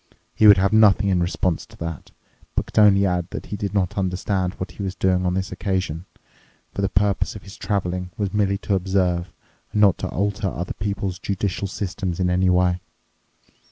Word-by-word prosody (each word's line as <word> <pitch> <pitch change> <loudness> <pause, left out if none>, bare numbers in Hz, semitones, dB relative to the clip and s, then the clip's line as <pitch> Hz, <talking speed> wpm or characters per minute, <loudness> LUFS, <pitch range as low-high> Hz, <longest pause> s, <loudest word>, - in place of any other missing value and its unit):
He 110 - +5
would 100 -1 +9
have 100 +2 +2
nothing 105 -2 +5
in 90 -2 +2
response 85 -1 0
to - - -17
that, 85 -3 -6 0.5
but - - 0
could - - -1
only 100 -2 +6
add 90 -2 0
that - - -6
he - - -5
did 100 -1 -3
not 100 0 0
understand 95 0 -1
what 95 0 -6
he 100 - -9
was 95 -1 -3
doing 95 -2 +1
on 90 - 0
this 95 0 -2
occasion, 90 -3 -2 0.7
for 100 - -3
the 100 - +1
purpose 100 +1 +1
of 105 - -9
his 100 - -11
traveling 90 -3 -2
was 100 -4 -2
merely 100 -2 +1
to 100 - 0
observe 90 -2 0 0.4
and 105 - -1
not 100 -4 +5
to - - -3
alter 100 +2 -1
other 90 0 -4
people's 100 -3 -3
judicial 100 0 -2
systems 95 -2 -4
in 90 -1 +1
any 90 +1 +2
way. 90 0 +2
95 Hz, 195 wpm, -22 LUFS, 90-100 Hz, 0.7 s, would